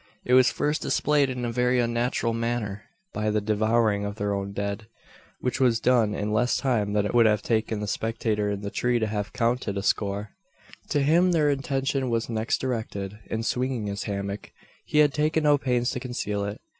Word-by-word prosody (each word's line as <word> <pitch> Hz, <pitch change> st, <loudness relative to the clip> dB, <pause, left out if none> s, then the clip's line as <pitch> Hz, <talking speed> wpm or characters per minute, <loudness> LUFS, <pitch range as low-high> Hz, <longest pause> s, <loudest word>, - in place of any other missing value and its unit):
It 125 Hz, -, +1 dB
was 130 Hz, -1 st, +6 dB
first 150 Hz, +1 st, -1 dB
displayed 145 Hz, -2 st, +2 dB
in 125 Hz, -1 st, -3 dB
a 120 Hz, -, -2 dB
very 125 Hz, +1 st, +2 dB
unnatural 120 Hz, 0 st, 0 dB
manner 115 Hz, -3 st, -3 dB, 0.3 s
by 110 Hz, 0 st, -1 dB
the 105 Hz, 0 st, +1 dB
devouring 110 Hz, 0 st, +1 dB
of 100 Hz, 0 st, -4 dB
their 105 Hz, -1 st, -1 dB
own 100 Hz, 0 st, -3 dB
dead 100 Hz, +1 st, -4 dB, 0.5 s
which 125 Hz, +1 st, -1 dB
was 120 Hz, -4 st, +3 dB
done 115 Hz, -4 st, +2 dB
in 105 Hz, +1 st, -2 dB
less 120 Hz, +3 st, +2 dB
time 110 Hz, -6 st, 0 dB
than 105 Hz, -1 st, +2 dB
it -, -, -2 dB
would 120 Hz, -2 st, +6 dB
have 105 Hz, -1 st, +1 dB
taken 110 Hz, -2 st, 0 dB
the 105 Hz, -, -3 dB
spectator 110 Hz, -1 st, -1 dB
in 100 Hz, -1 st, -3 dB
the 100 Hz, -1 st, -5 dB
tree 120 Hz, 0 st, +1 dB
to 110 Hz, -, 0 dB
have 105 Hz, -1 st, -3 dB
counted 115 Hz, -4 st, -1 dB
a 100 Hz, -, -2 dB
score. 100 Hz, +1 st, -1 dB, 0.6 s
To 145 Hz, -, +1 dB
him 175 Hz, +5 st, +4 dB
their 150 Hz, -3 st, +3 dB
attention 135 Hz, -1 st, -1 dB
was 115 Hz, 0 st, -1 dB
next 110 Hz, 0 st, 0 dB
directed. 105 Hz, -5 st, -4 dB
In 110 Hz, 0 st, -3 dB
swinging 125 Hz, -1 st, -1 dB
his 100 Hz, 0 st, -4 dB
hammock, 100 Hz, 0 st, -4 dB, 0.3 s
he -, -, -2 dB
had 150 Hz, -2 st, +5 dB
taken 155 Hz, +1 st, +1 dB
no 145 Hz, -1 st, +4 dB
pains 125 Hz, -2 st, 0 dB
to -, -, -3 dB
conceal 105 Hz, -5 st, -3 dB
it. 100 Hz, +1 st, -5 dB
115 Hz, 200 wpm, -26 LUFS, 105-125 Hz, 0.6 s, was